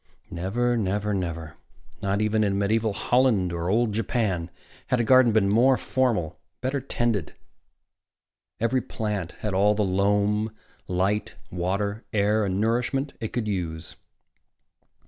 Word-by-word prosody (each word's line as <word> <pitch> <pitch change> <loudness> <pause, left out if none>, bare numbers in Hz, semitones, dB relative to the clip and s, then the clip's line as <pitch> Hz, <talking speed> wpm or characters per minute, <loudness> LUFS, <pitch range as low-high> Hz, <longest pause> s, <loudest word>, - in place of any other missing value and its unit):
Never, 120 +8 0
never, 105 -1 -1
never 85 -4 -4 0.4
not 100 +2 0
even 110 0 +2
in 100 -1 +1
medieval 110 +2 +1
Holland 115 -4 +2
nor 85 +1 -3
old 110 +1 +2
Japan 100 -5 -1 0.4
had 125 - +1
a - - +2
garden 130 0 +6
been 105 -2 +3
more 125 +6 +4
formal, 120 -11 0 0.3
been 130 - -1
better 140 0 -2
tended. 120 - -1 1.2
Every 115 +3 +1
plant 105 -7 -4
had 105 -2 -2
all 105 +2 +3
the 105 - +1
loam, 105 +3 +1 0.4
light, 95 +3 0 0.2
water, 100 +5 -2
air 105 +1 +2
and 95 0 -1
nourishment 125 +5 0
it 110 - -4
could 120 -3 -2
use. 85 -5 -4
105 Hz, 135 wpm, -25 LUFS, 95-115 Hz, 1.2 s, garden